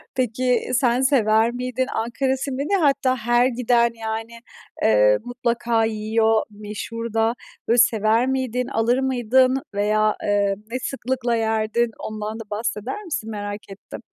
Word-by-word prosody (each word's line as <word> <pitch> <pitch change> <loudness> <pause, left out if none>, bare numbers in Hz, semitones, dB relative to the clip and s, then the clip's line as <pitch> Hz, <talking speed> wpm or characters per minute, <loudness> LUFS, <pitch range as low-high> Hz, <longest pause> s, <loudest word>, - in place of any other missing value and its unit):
Peki 250 0 0
sen 245 -1 +2
sever 230 -4 +3
miydin, 250 +1 -2
Ankara 260 +4 -1
simidi? 275 +5 -3
Hatta 275 -3 +2
her 240 +1 +2
giden 240 -1 +2
yani, 225 +1 -5 0.5
ııı, 105 -1 +4
mutlaka 235 -2 0
yiyor 220 0 +1
meşhur 215 +2 -6
da. 225 0 +2 0.3
Böyle 235 - +3
sever 225 0 +3
miydin, 255 -2 -1
alır 240 0 +1
mıydın 260 0 +2
veya, 215 +1 +2
eee, 200 -1 +1 0.2
ne 255 - -2
sıklıkla 255 -2 -2
yerdin? 225 +1 0
Ondan 215 +1 -5
da - - -6
bahseder 225 - -3
misin? 290 - -4
Merak 205 -1 -6
ettim. 195 0 -10
235 Hz, 130 wpm, -22 LUFS, 215-255 Hz, 0.5 s, ııı